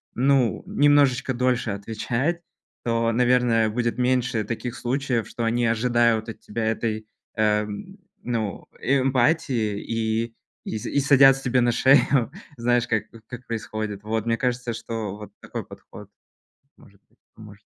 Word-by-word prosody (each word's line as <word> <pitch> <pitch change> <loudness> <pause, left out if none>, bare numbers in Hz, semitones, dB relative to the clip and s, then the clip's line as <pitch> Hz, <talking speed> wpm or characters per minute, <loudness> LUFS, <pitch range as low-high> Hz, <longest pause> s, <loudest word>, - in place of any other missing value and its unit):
ну, 130 -2 +2
немножечко 140 -3 +3
дольше 125 -1 0
отвечать, 115 - -2 0.4
то, 115 -1 +1
наверное, 120 -2 +3
будет 120 +1 -1
меньше 125 -3 +1
таких 115 +3 -5
случаев, 125 -2 -1
что 120 - -4
они 120 +1 +1
ожидают 115 -1 +2
от 110 - -8
тебя 110 +1 -4
этой, 110 -1 -2 0.3
эм, 105 -1 -1 0.3
ну, 110 -5 -3 0.2
эмпатии 130 -4 +1
и 115 +1 -2 0.3
и - - -3
с 105 - -7
и 140 - 0
садятся 135 -1 +6
тебе 125 0 +2
на 120 -1 +2
шею. 130 -1 +4 0.2
Знаешь, 120 -1 +1
как 110 -3 0 0.2
как 125 0 -9
происходит? 110 -2 -4
Вот, 110 +1 -2
мне 115 -1 +1
кажется, 125 -1 -1
что 110 -3 -5
вот 105 0 -10
такой - - -6
подход, - - -13 0.7
может 100 0 -20
быть, - - -35 0.2
поможет. - - -14
120 Hz, 140 wpm, -24 LUFS, 110-125 Hz, 0.7 s, садятся